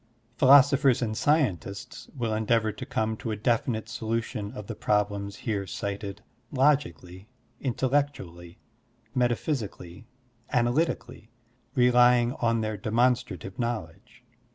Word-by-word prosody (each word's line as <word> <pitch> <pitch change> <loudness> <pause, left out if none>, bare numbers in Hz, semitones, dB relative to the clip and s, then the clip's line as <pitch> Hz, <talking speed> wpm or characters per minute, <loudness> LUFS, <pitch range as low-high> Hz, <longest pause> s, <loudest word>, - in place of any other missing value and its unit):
Philosophers 135 -1 +6
and 110 -2 -2
scientists 105 - -1
will 115 -3 -1
endeavor 110 0 +1
to - - -8
come 110 0 -1
to 115 - -5
a 110 - -1
definite 115 0 0
solution 110 -2 -3
of 105 -5 -7
the 115 - -5
problems 105 -1 -1
here 100 -4 -2
cited 100 +1 -5 0.3
logically, 120 - 0 0.3
intellectually, 125 -10 -2 0.6
metaphysically, 120 - -2 0.4
analytically, 120 -2 -1 0.5
rely 125 -1 +5
ing 120 +1 0
on 115 -2 0
their 110 -1 -3
demonstrative 110 - 0
knowledge. 115 +1 -5
115 Hz, 105 wpm, -27 LUFS, 105-125 Hz, 0.6 s, Philosophers